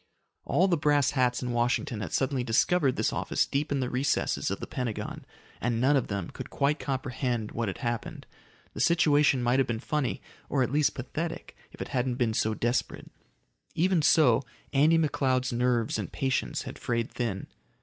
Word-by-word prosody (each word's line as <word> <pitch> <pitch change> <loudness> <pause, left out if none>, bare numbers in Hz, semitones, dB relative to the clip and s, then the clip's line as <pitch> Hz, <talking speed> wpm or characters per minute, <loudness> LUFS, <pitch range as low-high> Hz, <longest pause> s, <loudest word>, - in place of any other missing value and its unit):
All 185 - +3
the 175 -3 +2
brass 145 -1 +3
hats 125 -3 +1
in 125 - -2
Washington 120 -2 0
had 90 - -5
suddenly 135 -2 0
discovered 130 +4 +2
this - - 0
office - - 0
deep 145 +2 -2
in 140 -1 +1
the 125 - -1
recesses 130 +3 0
of - - -3
the - - -5
Pentagon. 120 -4 -4 0.4
And 120 0 0
none 135 +4 +4
of 135 - +1
them 100 -4 -4
could - - -8
quite 145 +2 0
comprehend 130 -4 -2
what 115 -1 -2
had 95 - -5
happened. 120 -1 -4 0.5
The - - -7
situation 150 -5 +3
might 120 +2 +2
have 135 - +2
been 115 -2 -2
funny, 140 0 -1 0.3
or 135 -3 +2
at 125 - -2
least 150 0 +2
pathetic, 155 +6 -5 0.2
if - - -6
it - - -11
hadn't 125 -2 0
been 120 -3 0
so 110 0 0
desperate. 120 +3 -2 0.6
Even 180 0 +2
so, 140 -6 +5 0.3
Andy 150 +4 +5
McCloud's 130 -5 +1
nerves 120 -2 +1
and 100 - -5
patience 135 0 -1
had - - -8
frayed 115 -1 -2
thin. 110 -6 -3
130 Hz, 180 wpm, -28 LUFS, 120-145 Hz, 0.6 s, so